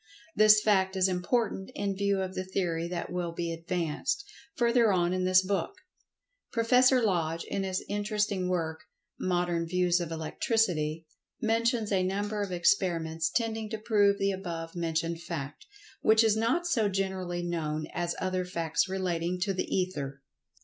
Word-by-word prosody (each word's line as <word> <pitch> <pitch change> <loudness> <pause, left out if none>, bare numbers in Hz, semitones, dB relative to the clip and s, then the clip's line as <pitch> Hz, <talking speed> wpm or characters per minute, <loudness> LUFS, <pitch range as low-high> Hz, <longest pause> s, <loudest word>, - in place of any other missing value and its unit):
This 215 0 +6
fact 190 -2 +2
is 190 0 +3
important 190 +3 -1
in 200 -1 -1
view 200 0 +1
of 185 0 -5
the 185 - -3
theory 175 -3 -2
that 175 0 -4
will 175 -2 -2
be 170 0 -3
advanced, 170 - -2 0.3
further 235 -2 +3
on 175 -1 +2
in 185 0 0
this 185 0 +5
book. 200 - -1 0.8
Prof. 250 +3 +4
Lodge, 175 -10 +1
in 195 - -3
his 190 -1 -2
interesting 205 -2 -1
work, 160 -3 -1 0.4
"Modern 175 -2 0
Views 180 0 +2
of 170 -2 -4
Electricity," 165 - 0 0.3
mentions 225 -1 +1
a 190 -2 +3
number 205 +3 -1
of 200 -2 -3
experiments 170 -3 +1
tending 225 -1 -1
to 220 - -3
prove 205 -2 +3
the 195 0 +1
above 170 -4 -5
mentioned[Pg 170 -1 -1
107] 165 +1 -1
fact, 145 -4 -5 0.4
which 220 +1 +5
is 220 -1 +3
not 235 +11 +1
so 225 -11 +2
generally 185 -2 -2
known 155 -3 -2
as 175 0 -2
other 185 0 -1
facts 170 0 -1
relating 180 -2 -1
to 195 +1 +1
the 185 - -2
Ether. 145 -7 -2
185 Hz, 155 wpm, -29 LUFS, 170-210 Hz, 0.8 s, This